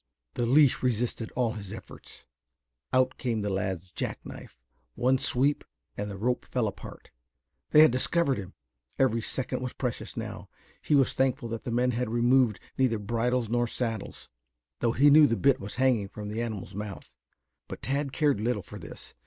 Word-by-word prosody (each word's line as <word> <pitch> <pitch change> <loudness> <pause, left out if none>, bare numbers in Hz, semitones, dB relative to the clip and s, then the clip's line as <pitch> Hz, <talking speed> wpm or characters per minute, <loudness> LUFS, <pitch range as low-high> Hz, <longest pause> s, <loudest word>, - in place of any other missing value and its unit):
The 120 - -1
leash 140 +1 +5
resisted 120 -2 -1
all 120 -3 +1
his 100 -4 -7
efforts. - - -11 0.7
Out 130 0 +2
came 115 -4 -1
the 100 - -1
lad's 95 -2 -3
jack - - -4
knife. - - -11 0.4
One 130 +1 +2
sweep 140 +4 +2 0.3
and 105 0 -4
the 100 - -6
rope 125 +5 0
fell 125 -4 -1
apart. 100 - -9 0.6
They 150 - +8
had 155 - +6
discovered 135 +1 +1
him. 95 -1 -9 0.4
Every 115 -4 +2
second 125 +2 -2
was 125 -1 -4
precious 125 -4 -4
now. - - -6 0.3
He 150 - +2
was 135 -2 +4
thankful 130 -2 0
that 115 +3 -5
the 120 - -3
men 125 +2 +2
had 125 0 -2
removed 120 -1 +3 0.2
neither 125 -4 +3
bridles 115 +3 0
nor 120 +2 +1
saddles, 115 -3 -4 0.5
though 115 -1 +1
he 145 +4 +5
knew 150 0 +8
the 115 - +1
bit 135 -1 +3
was 100 -3 -7
hanging 125 -6 +2
from 105 +1 -7
the 110 +2 -3
animal's 110 -5 -5
mouth. 105 0 -7 0.5
But - - -8
Tad 140 +1 -1
cared 145 -6 +2
little 110 -3 -1
for - - -10
this. - - -10
120 Hz, 180 wpm, -28 LUFS, 110-130 Hz, 0.7 s, They